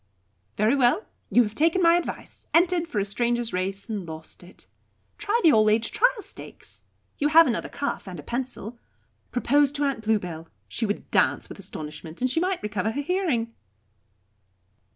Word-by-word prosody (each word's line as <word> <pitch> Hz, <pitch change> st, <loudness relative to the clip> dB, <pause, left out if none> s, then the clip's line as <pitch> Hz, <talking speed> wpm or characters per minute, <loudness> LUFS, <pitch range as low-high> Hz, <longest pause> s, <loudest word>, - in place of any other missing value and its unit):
Very 215 Hz, +6 st, +3 dB
well; 275 Hz, -, +3 dB, 0.2 s
you 245 Hz, -, +5 dB
have 210 Hz, -2 st, -4 dB
taken 325 Hz, +8 st, +2 dB
my 335 Hz, -2 st, +5 dB
advice, 350 Hz, -, -5 dB
entered 345 Hz, 0 st, +3 dB
for 240 Hz, -, -5 dB
a 200 Hz, -, +1 dB
Stranger's 240 Hz, +3 st, 0 dB
Race 190 Hz, +2 st, -3 dB
and 205 Hz, -6 st, -4 dB
lost 160 Hz, 0 st, -9 dB
it. 180 Hz, +1 st, -12 dB, 0.5 s
Try 415 Hz, +3 st, +1 dB
the 325 Hz, -, +7 dB
All 215 Hz, -1 st, +5 dB
aged 220 Hz, +2 st, +1 dB
Trial 475 Hz, -2 st, +2 dB
Stakes. -, -, -11 dB, 0.4 s
You 290 Hz, -, +2 dB
have 325 Hz, +2 st, +7 dB
another 235 Hz, -5 st, -1 dB
cuff, 285 Hz, -7 st, -4 dB
and 180 Hz, -3 st, -7 dB
a -, -, -9 dB
pencil. 240 Hz, -, -5 dB, 0.5 s
Propose 280 Hz, +3 st, +3 dB
to 290 Hz, 0 st, -1 dB
Aunt 275 Hz, -5 st, -1 dB
Bluebell; 180 Hz, -7 st, -2 dB, 0.2 s
she 225 Hz, -, -2 dB
would 205 Hz, -, -4 dB
dance -, -, +2 dB
with -, -, -10 dB
astonishment, 155 Hz, -3 st, -7 dB
and 255 Hz, 0 st, +1 dB
she 325 Hz, -, +1 dB
might 370 Hz, +1 st, -1 dB
recover 210 Hz, 0 st, -1 dB
her 285 Hz, -, -2 dB
hearing." 285 Hz, -9 st, -1 dB
240 Hz, 175 wpm, -25 LUFS, 205-315 Hz, 0.5 s, the